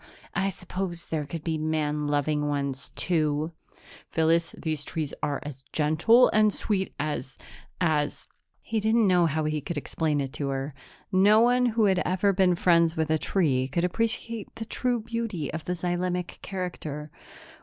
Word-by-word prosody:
I 195 0 +1
suppose 180 -2 -5
there 150 -3 -2
could 165 +1 -6
be 160 -2 -1
man 150 -1 -1
loving 150 0 +1
ones, 140 -2 -2
too." 155 -2 0 0.6
"Phyllis, 165 +1 +2
these 155 -3 -2
trees 150 -1 -3
are 145 -1 -1
as 140 -3 -8
gentle 165 +12 +5
and 215 0 +4
sweet 195 -2 -2
as 145 -3 -3 0.4
as 155 -4 0 0.2
" - - -57
He 225 -1 -2
didn't 220 +1 +3
know 180 -3 +4
how 155 +1 -1
he 155 0 -1
could 170 +3 -4
explain 150 0 -1
it 135 -1 -3
to 140 - -3
her. 135 +1 -3 0.4
No 200 +3 +6
one 245 +1 +4
who 225 -2 +2
had 190 -2 +3
never 190 +2 +2
been 185 -1 +3
friends 170 -2 +3
with 160 0 0
a 160 - +2
tree 135 -10 +1
could 155 +6 -1
appreciate 225 +3 -2
the 225 0 -5
true 245 +1 -1
beauty 220 -9 -3
of 160 0 -5
the 180 - -1
xylemic 180 0 -2
character. 155 -6 -5
165 Hz, 165 wpm, -27 LUFS, 150-195 Hz, 0.6 s, No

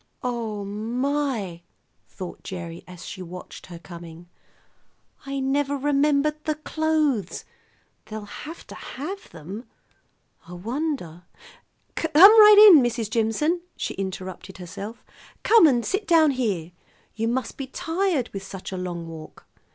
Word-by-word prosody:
"Oh, 225 -5 -3
my!" 230 -2 -2 0.5
thought 185 -2 -8
Gerry 170 -2 -7
as 180 -2 -11
she 185 - -7
watched 180 0 -9
her 175 -2 -9
coming. 170 0 -11 1.0
"I 275 0 -3
never 280 +1 0
remembered 290 +2 +1
the 310 - 0
clothes. 305 - -1 0.6
They'll 215 -1 -6
have 310 +10 -9
to - - -11 0.2
have 375 +9 -6
them. 185 +9 -9 0.8
I 175 - -10
wonder 210 - -4 0.7
"Come 320 - -3
right 420 +3 +10
in, 300 - +8
Mrs. 235 -3 -1
Jimson," 240 +11 +1 0.2
she - - -3
interrupted 190 -1 -6
herself; 200 +6 -8 0.4
"come 445 -7 +7
and 245 -5 +2
sit 405 +2 -2
down 320 -3 +5
here. 200 -11 -2 0.4
You 225 +1 -2
must 250 +2 -2
be 270 - -6
tired 325 -2 -1
with 195 - -4
such 190 0 -8
a 190 - -4
long 175 -2 -5
walk." 160 -1 -11
235 Hz, 130 wpm, -24 LUFS, 185-300 Hz, 1.0 s, right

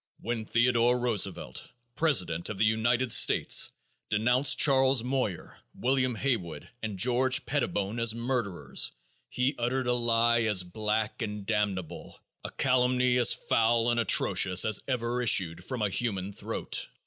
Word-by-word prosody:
_When 115 -2 -4
Theodore 120 0 +2
Roosevelt, 110 -6 -2 0.3
president 90 - 0
of 110 - -6
the 110 - +2
United 115 +3 +1
States, - - +4 0.4
denounced 125 +6 +2
Charles 135 -3 +3
Moyer, 125 -8 -4 0.2
William 130 -1 0
Haywood 110 - -3
and 105 -3 -5
George 125 +5 +1
Pettibone 120 -6 -2
as 115 -1 +2
murderers, 115 - -2 0.4
he 130 +3 -1
uttered 125 +2 -1
a 125 - +1
lie 120 0 +2
as 105 -5 +2
black 105 +5 -3
and 105 -2 -5
damnable, 95 -6 -4 0.2
a - - -5
calumny 125 -1 +1
as 120 -1 +4
foul 115 +1 +1
and 120 - 0
atrocious 95 -4 +3
as 110 -2 +2
ever 125 -1 -2
issued 95 -8 +2
from 125 -4 -4
a 105 - 0
human 100 -2 -2
throat. - - -2
115 Hz, 135 wpm, -28 LUFS, 105-125 Hz, 0.4 s, States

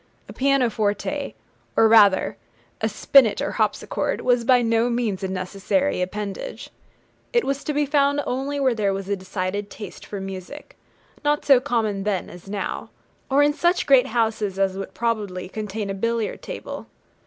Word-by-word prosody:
A - - -10
pianoforte, 260 0 0 0.4
or 225 - +6
rather 210 -4 +5 0.5
a - - +1
spinnet 240 -7 +4
or - - -1
harpsichord, - - -1
was 245 -1 +2
by 250 0 +4
no 230 +1 +2
means 235 -5 -1
a 190 - -1
necessary 190 +8 -1
appendage. 205 - -5 0.6
It 475 -2 +3
was 275 0 -2
to - - 0
be 295 0 +1
found 285 0 +2
only 275 +3 -2
where 265 -3 +3
there 205 -3 0
was 195 0 -6
a 200 - +1
decided 190 +1 -4
taste 205 -3 -9
for 205 - -6
music, 195 +9 -8 0.5
not 295 0 +1
so 275 -3 +7
common 220 -5 -1
then 195 -2 -2
as 180 +2 -13
now, 200 -1 -4 0.4
or 280 +2 +4
in 295 0 +3
such 345 +4 +1
great 270 -3 +5
houses 220 -4 0
as 195 -1 +1
would 195 0 -6
probably 210 -6 -2
contain 210 0 -4
a - - -2
billiard 230 +2 -2
table. - - -7
225 Hz, 165 wpm, -23 LUFS, 195-270 Hz, 0.6 s, so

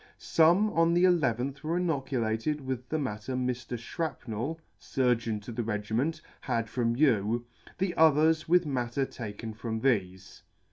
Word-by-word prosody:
Some 175 +6 +3
on 165 -1 +3
the 175 +1 +5
i - - +6 0.3
ith 135 +3 -4
were 165 +3 0
inoculated 135 -5 -1
with 130 -2 -5
the 160 - 0
matter 125 -3 -3
Mr. 125 -1 -2
Shrapnell 130 0 -4 0.2
(Surgeon 120 -4 0
to 110 - -8
the 120 +1 -3
Regiment) 115 +8 -1 0.2
had 115 -1 -1
from 115 0 0
you, 120 -4 +2 0.3
the 185 -2 0
others 160 0 +4
with 180 0 +5
matter 130 -1 -1
taken 110 -2 -7
from 110 0 -4
thefe. 95 -7 -1
130 Hz, 145 wpm, -29 LUFS, 115-155 Hz, 0.3 s, i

